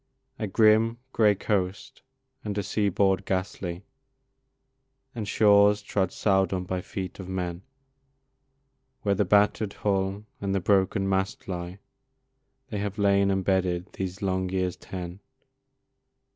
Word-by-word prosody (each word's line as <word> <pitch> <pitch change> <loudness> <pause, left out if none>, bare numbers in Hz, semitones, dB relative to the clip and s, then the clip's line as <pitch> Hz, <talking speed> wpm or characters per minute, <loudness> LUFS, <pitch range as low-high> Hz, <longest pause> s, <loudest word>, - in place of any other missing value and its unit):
A 110 - -2
grim, 110 +3 +4 0.2
grey 105 -2 +4
coast 95 0 -2 0.4
and 105 -1 -4
a 100 - 0
seaboard 100 -1 +1
ghastly, 95 -1 -3 1.3
And 110 -4 -5
shores 105 0 +5
trod 95 -3 0
seldom 95 -2 +1
by 90 0 -3
feet 95 0 -6
of 95 -1 -7
men 90 -2 -3 1.4
Where 100 - +2
the 100 +1 +1
batter'd 105 +1 +3
hull 100 0 -1 0.2
and 100 -1 -1
the - - +2
broken 95 +1 +2
mast 95 0 -1
lie, 90 0 -5 0.9
They 105 -4 -3
have 100 0 -3
lain 100 -1 +3
embedded 95 -1 0
these 95 +1 -5
long 95 -1 0
years 90 -1 -1
ten. 90 0 -7
95 Hz, 120 wpm, -27 LUFS, 95-105 Hz, 1.4 s, shores